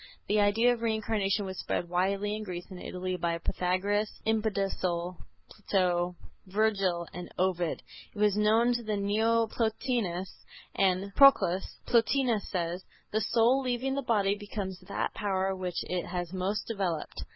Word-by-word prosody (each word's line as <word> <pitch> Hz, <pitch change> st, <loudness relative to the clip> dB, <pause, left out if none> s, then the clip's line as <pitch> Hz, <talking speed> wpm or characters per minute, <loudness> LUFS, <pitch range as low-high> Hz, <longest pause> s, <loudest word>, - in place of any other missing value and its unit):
The 210 Hz, +1 st, +2 dB
idea 220 Hz, +4 st, +4 dB
of 235 Hz, -, -6 dB
Reincarnation 215 Hz, -3 st, 0 dB
was 190 Hz, 0 st, -6 dB
spread 175 Hz, -, -2 dB
widely 195 Hz, +4 st, 0 dB
in 215 Hz, -, -5 dB
Greece 180 Hz, -4 st, -6 dB
and 180 Hz, -, -8 dB
Italy 185 Hz, 0 st, -3 dB
by 170 Hz, -1 st, -1 dB
Pythagoras, 190 Hz, +5 st, 0 dB, 0.2 s
Empedocles, 195 Hz, -5 st, 0 dB, 0.3 s
Plato, 180 Hz, -3 st, 0 dB, 0.3 s
Virgil 195 Hz, -4 st, +1 dB
and 175 Hz, 0 st, -7 dB
Ovid. 180 Hz, -2 st, 0 dB, 0.3 s
It -, -, -16 dB
was 210 Hz, -1 st, +3 dB
known 220 Hz, +3 st, +4 dB
to 240 Hz, -, -1 dB
the 215 Hz, -2 st, -2 dB
Neo 220 Hz, +3 st, +2 dB
Platonists, 220 Hz, 0 st, -1 dB, 0.7 s
Plotinus -, -, -36 dB, 0.3 s
and 195 Hz, +1 st, +1 dB
Proclus. 195 Hz, -10 st, +5 dB
Plotinus 235 Hz, -2 st, +2 dB
says: 175 Hz, 0 st, -2 dB, 0.3 s
"The 215 Hz, -, +1 dB
soul 235 Hz, +5 st, +3 dB
leaving 255 Hz, +1 st, -1 dB
the 280 Hz, -, -1 dB
body 210 Hz, -6 st, +2 dB
becomes 200 Hz, -2 st, -5 dB
that 200 Hz, -, -2 dB
power 190 Hz, -1 st, -1 dB
which 180 Hz, -2 st, -3 dB
it 180 Hz, -1 st, -3 dB
has 175 Hz, 0 st, -4 dB
most 190 Hz, +3 st, -1 dB
developed. 190 Hz, -8 st, -3 dB
200 Hz, 150 wpm, -29 LUFS, 185-220 Hz, 0.7 s, Proclus